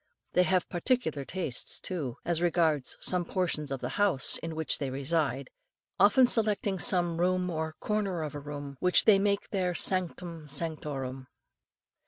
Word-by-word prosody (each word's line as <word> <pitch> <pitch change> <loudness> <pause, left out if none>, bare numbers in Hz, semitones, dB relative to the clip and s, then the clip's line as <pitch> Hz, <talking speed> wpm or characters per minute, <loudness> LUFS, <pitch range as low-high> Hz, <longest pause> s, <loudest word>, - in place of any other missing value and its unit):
They 180 - +4
have 180 -1 +1
particular 175 - -1
tastes 170 -9 -3
too, 150 -10 -4
as 170 -1 +1
regards 160 -5 +1
some 180 -1 +4
portions 170 -4 -2
of 135 - -4
the - - -3
house 175 -10 +2
in 165 -1 -6
which 160 -1 +1
they 140 - -2
reside, 150 - -2 0.5
often 260 -1 +6
selecting 210 -5 +1
some 175 -6 +3
room 180 0 +1
or 160 -1 -3
corner 200 -6 -1
of 150 - -5
a 145 - -5
room 145 -1 -7
which 180 0 +4
they 205 -3 +6
make 200 0 0
their 180 -3 -1
"sanctum 175 -4 -1
sanctorum." 140 -4 -4
170 Hz, 155 wpm, -29 LUFS, 150-185 Hz, 0.5 s, often